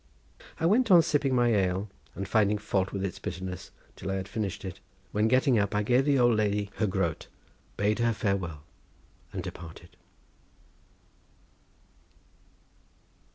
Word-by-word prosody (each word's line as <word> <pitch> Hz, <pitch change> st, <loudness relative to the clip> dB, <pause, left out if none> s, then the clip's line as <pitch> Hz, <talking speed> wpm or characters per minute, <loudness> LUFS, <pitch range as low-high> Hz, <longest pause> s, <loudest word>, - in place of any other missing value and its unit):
I 165 Hz, -, 0 dB
went 225 Hz, +7 st, +3 dB
on 175 Hz, -3 st, +8 dB
sipping 140 Hz, -3 st, +1 dB
my 120 Hz, -1 st, +3 dB
ale 95 Hz, 0 st, +1 dB, 0.3 s
and 100 Hz, -, -4 dB
finding 105 Hz, 0 st, +3 dB
fault 95 Hz, -2 st, -1 dB
with 100 Hz, -1 st, -2 dB
its 95 Hz, -, -5 dB
bitterness 90 Hz, 0 st, -6 dB, 0.3 s
till -, -, -6 dB
I 95 Hz, -, -1 dB
had 95 Hz, 0 st, -4 dB
finished 100 Hz, -2 st, -4 dB
it, 95 Hz, -, -6 dB, 0.3 s
when 105 Hz, +1 st, +2 dB
getting 130 Hz, -1 st, +3 dB
up 100 Hz, 0 st, 0 dB
I 105 Hz, -, +2 dB
gave 125 Hz, +5 st, +3 dB
the 145 Hz, -2 st, +3 dB
old 120 Hz, -2 st, +4 dB
lady 105 Hz, -1 st, 0 dB
her 110 Hz, -, +1 dB
groat, 95 Hz, -5 st, -1 dB, 0.5 s
bade 105 Hz, +2 st, +1 dB
her 115 Hz, 0 st, +3 dB
farewell 95 Hz, -, -2 dB, 0.7 s
and -, -, -4 dB
departed. 85 Hz, 0 st, -10 dB
105 Hz, 145 wpm, -28 LUFS, 95-120 Hz, 0.7 s, on